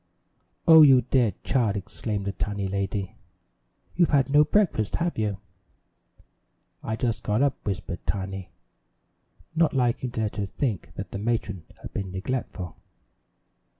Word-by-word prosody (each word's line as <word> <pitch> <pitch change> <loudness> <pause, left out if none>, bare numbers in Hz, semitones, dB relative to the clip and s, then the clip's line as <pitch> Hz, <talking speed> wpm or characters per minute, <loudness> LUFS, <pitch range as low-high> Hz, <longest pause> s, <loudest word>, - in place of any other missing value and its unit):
"Oh, 160 -1 +10
you 135 -4 +8
dear 125 -5 +2
child!" 110 -6 +1
exclaimed 100 +1 -4
the 100 - -1
tiny 100 0 -3
lady. 100 0 -2 0.8
"You've 175 -1 +4
had 140 -2 +3
no 145 +1 +7
breakfast, 155 - +1
have 170 0 0
you?" 105 -3 0 1.4
"I 110 - -2
just 115 0 -1
got 105 +5 +1
up," 140 - 0
whispered 95 -3 -4
Tiny, 95 -1 -3 1.1
not 160 -3 +3
liking 125 0 +1
to 110 - -2
let 105 -2 -2
her 100 -1 -1
think 95 - -3
that 100 - -6
the 100 - -4
matron 105 -5 -2 0.2
had - - -8
been 95 -2 -4
neglectful. 95 -3 -4
105 Hz, 140 wpm, -26 LUFS, 100-130 Hz, 1.4 s, Oh